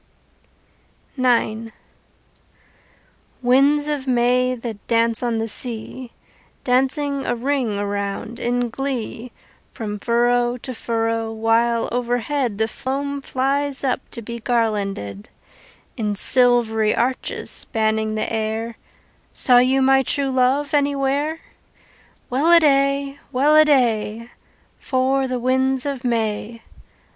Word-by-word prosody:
IX 230 -3 0 1.7
Winds 280 +4 +3
of 290 -3 -3
May, 250 0 +2
that 230 -4 -8
dance 230 -1 +2
on 240 -2 -1
the 225 0 -2
sea, 240 +2 -3 0.5
Dancing 270 +2 0
a - - -1
ring 245 -4 -1
around 200 +2 -4
in 245 0 -1
glee 250 -2 -4 0.4
From 210 -2 -6
furrow 240 +2 +1
to 255 +1 -7
furrow, 225 -1 -2
while 225 +1 +1
overhead 245 0 -1
The 220 +1 +1
foam 280 +3 -4
flies 275 +2 -1
up 260 -1 0
to 235 - -6
be 235 +2 -6
garlanded, 205 - -2 0.7
In 210 -2 -2
silvery 225 -2 +3
arches 255 +2 -1
spanning 220 0 -1
the 215 - -2
air, 225 +1 -3 0.6
Saw 250 -1 +6
you 260 +2 +3
my 270 0 +4
true 275 +1 -1
love 265 +3 +1
anywhere? 285 +2 0 0.9
Welladay! 280 -2 +3
Welladay! 255 -6 +2 0.5
For 265 0 0
the 255 -1 -2
winds 260 +1 +1
of 280 -3 -4
May! 225 -1 -2
245 Hz, 105 wpm, -21 LUFS, 225-270 Hz, 1.7 s, Saw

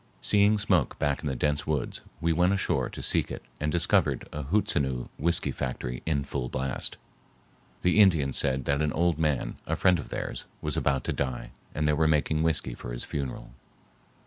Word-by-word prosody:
Seeing 105 +1 +4
smoke 95 - +1
back 75 +1 0
in 75 - -3
the 65 - -1
dense 75 +2 0
woods, 75 -5 -2 0.2
we 85 0 +2
went 90 +4 +3
ashore 95 - 0
to - - -8
seek - - +1
it - - -6 0.2
and 75 0 0
discovered 85 0 +2
a 75 - -3
Hootsenoo 70 -8 0
whiskey 85 +4 0
factory 65 -1 -4
in 70 -3 +1
full 65 -3 -3
blast. 65 0 -2 0.9
The 90 +4 +4
Indians 80 -10 +5
said 65 -1 +2
that 70 +1 +1
an 75 -1 +1
old 85 -2 +1
man, 75 -5 0
a - - 0
friend 90 -2 +4
of - - -7
theirs, - - -4
was - - -2
about 70 -2 +1
to - - -1
die 65 -3 -3 0.2
and 75 0 +1
they 75 - +3
were 80 +1 +3
making 75 0 +2
whiskey 80 -6 0
for - - -7
his - - -5
funeral. 65 -4 -5
75 Hz, 190 wpm, -28 LUFS, 65-85 Hz, 0.9 s, Indians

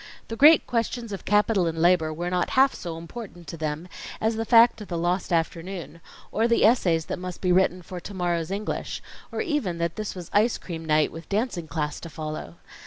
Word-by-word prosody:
The 225 - -3
great 300 +6 +7
questions 230 -1 -2
of 195 -3 -6
Capital 205 -3 +3
and 165 0 -3
Labor, 165 -1 +3
were 175 +3 -3
not 180 -1 0
half 270 +1 +6
so 170 -2 -6
important 175 +1 -9
to - - -5
them, 155 +1 -4 0.3
as 220 +1 +1
the 225 +1 -2
fact 230 -1 +6
of 210 - -8
the 170 - -3
lost 175 +3 -1
afternoon, 170 +1 -2 0.3
or 225 +2 +2
the 235 -2 +4
essays 175 -9 +3
that - - -4
must 180 -1 -6
be 180 - +1
written 180 0 +2
for 180 +1 -7
to 200 - -9
morrow's 175 -3 -1
English, 200 +2 -4 0.3
or - - -2
even 295 - -1
that 170 0 -2
this 215 -2 -4
was 175 -2 -8
ice 215 +4 +3
cream 165 -3 -7
night 155 -1 +3
with 165 +1 -10
dancing 205 -5 -1
class 150 -2 -3
to 165 - -8
follow. 155 - -6
180 Hz, 210 wpm, -25 LUFS, 165-215 Hz, 0.3 s, great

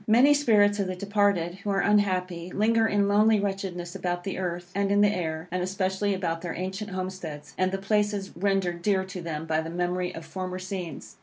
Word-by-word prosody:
Many 245 +7 +6
spirits 210 -7 +4
of 195 - 0
the 185 - -3
departed, 200 -3 +1
who 205 - -5
are 195 -1 +2
unhappy, 185 -4 +1
linger 225 +2 +3
in 205 -2 +2
lonely 210 +1 +4
wretchedness 195 -3 -3
about 175 -1 -2
the 195 - -4
earth, 175 -1 -4
and 200 0 0
in 205 0 +4
the 205 0 +4
air, 160 -1 -3
and 180 0 -1
especially 190 +2 0
about 165 -3 -2
their 175 -2 -4
ancient 190 +3 -4
homesteads, 185 -5 -6
and 185 0 +1
the 195 - -1
places 205 0 0
rendered 195 -3 0
dear 190 0 +2
to 185 -1 -7
them 160 -2 -4
by 160 0 +1
the 160 - -6
memory 180 +1 -1
of 165 - -8
former 185 +2 -5
scenes. 185 -4 -6
190 Hz, 205 wpm, -27 LUFS, 175-205 Hz, -, Many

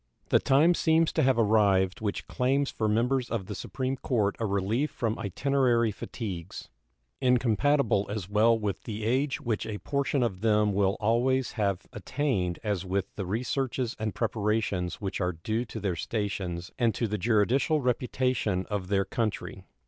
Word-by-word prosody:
The - - +5
time 150 +6 +4
seems 160 -1 +3
to 160 - +2
have 130 -3 +3
arrived 100 -4 +3
which 105 -2 -2
claims 135 +2 0
for 110 - -1
members 120 +4 +1
of 110 -5 -2
the - - -6
Supreme 130 0 -3
Court 105 -6 0
a 115 - 0
relief 100 +9 0
from 115 -1 -2
itinerary 120 +1 +1
fatigues, 95 -4 -6 0.5
incompatible 125 -2 +2
as 100 -3 -4
well 110 +3 +4
with 105 -4 -3
the 110 -1 -5
age 130 +4 0
which 110 -3 -2
a 105 -2 -4
portion 140 +1 0
of 100 -6 -2
them 105 -2 +3
will 100 +1 +2
always 120 +4 +1
have 100 -5 -1
attained 120 - -1
as 100 -4 -1
with 95 0 -2
the 95 -3 -4
researches 125 +3 -1
and 110 -2 -2
preparations 105 -5 -1
which 95 -2 -4
are 90 0 0
due 110 +9 -2
to 115 - -7
their 95 -4 -1
stations 95 -3 -3
and 115 -3 +2
to 115 - 0
the 105 0 -3
juridical 120 - +2
reputation 125 -6 0
of 100 -3 -2
their 100 0 +1
country. 110 -4 -3
110 Hz, 165 wpm, -28 LUFS, 100-125 Hz, 0.5 s, The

